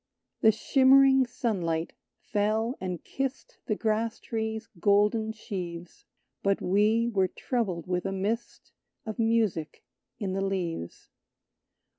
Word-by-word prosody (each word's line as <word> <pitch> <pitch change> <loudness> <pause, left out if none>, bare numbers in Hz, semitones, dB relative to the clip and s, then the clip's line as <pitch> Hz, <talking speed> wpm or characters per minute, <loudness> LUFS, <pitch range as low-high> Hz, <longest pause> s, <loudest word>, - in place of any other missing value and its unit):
The 220 - +7
shimmering 265 +3 +5
sunlight 175 -9 -2 0.2
fell 220 +4 0
and 180 -3 -4
kissed 270 0 -4
The 215 - +1
grasstree's 220 0 -2
golden 210 +3 +3
sheaves; 175 -5 -7 0.4
But 200 0 +1
we 215 +5 +2
were 195 -5 +2
troubled 190 -6 -2
with 180 +1 -1
a - - -2
mist 205 +5 -3 0.3
Of 220 0 -6
music 225 -8 0 0.3
in 195 -3 -3
the 195 - -1
leaves. 180 - -4
215 Hz, 110 wpm, -28 LUFS, 185-230 Hz, 0.4 s, The